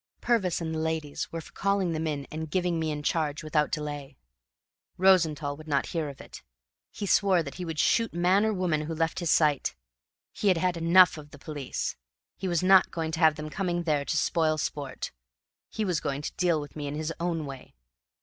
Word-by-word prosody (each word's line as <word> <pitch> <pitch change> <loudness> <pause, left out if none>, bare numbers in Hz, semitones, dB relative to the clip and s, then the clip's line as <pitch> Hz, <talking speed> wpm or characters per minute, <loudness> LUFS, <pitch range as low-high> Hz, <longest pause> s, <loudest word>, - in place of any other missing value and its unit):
Purvis 215 -8 +1
and 160 -1 -3
the 160 - -2
ladies 160 -2 -3
were 165 - -4
for - - -15
calling 200 -3 0
them 160 0 -2
in 145 -2 -3
and 160 0 -5
giving 175 0 0
me 160 -1 -1
in 150 -1 -3
charge 155 -1 -1
without 150 -1 +1
delay. 145 -3 -4 0.8
Rosenthall 160 -6 +3
would 155 +2 -13
not 140 -2 +1
hear 160 -4 -2
of 140 - -11
it. - - -11 0.5
He 205 - -5
swore 190 -3 +3
that 140 -3 -7
he 180 - -6
would 160 -2 -5
shoot 230 +8 +2
man 180 +4 +3
or 220 - +2
woman 180 -6 0
who 160 +2 -4
left 165 +2 0
his 170 -3 -2
sight. 150 - +2 0.6
He 210 - -2
had 185 -3 +5
had 180 +1 +1
enough 170 0 +5
of 150 -1 -12
the 145 - -13
police. 145 -2 -4 0.4
He 190 - -4
was 175 -1 0
not 190 0 +6
going 160 -1 -3
to 160 - -3
have 160 -3 +5
them 155 0 -6
coming 175 -2 -1
there 150 -4 +1
to 155 - -1
spoil 155 0 +2
sport; 140 -3 -4 0.6
he 215 - -2
was 180 -5 0
going 140 0 -3
to - - -4
deal 175 -3 +1
with 145 -1 -9
me 145 -2 -4
in 140 - -4
his 155 +1 -3
own 170 -2 -1
way. 135 -2 -10
160 Hz, 215 wpm, -28 LUFS, 150-180 Hz, 0.8 s, not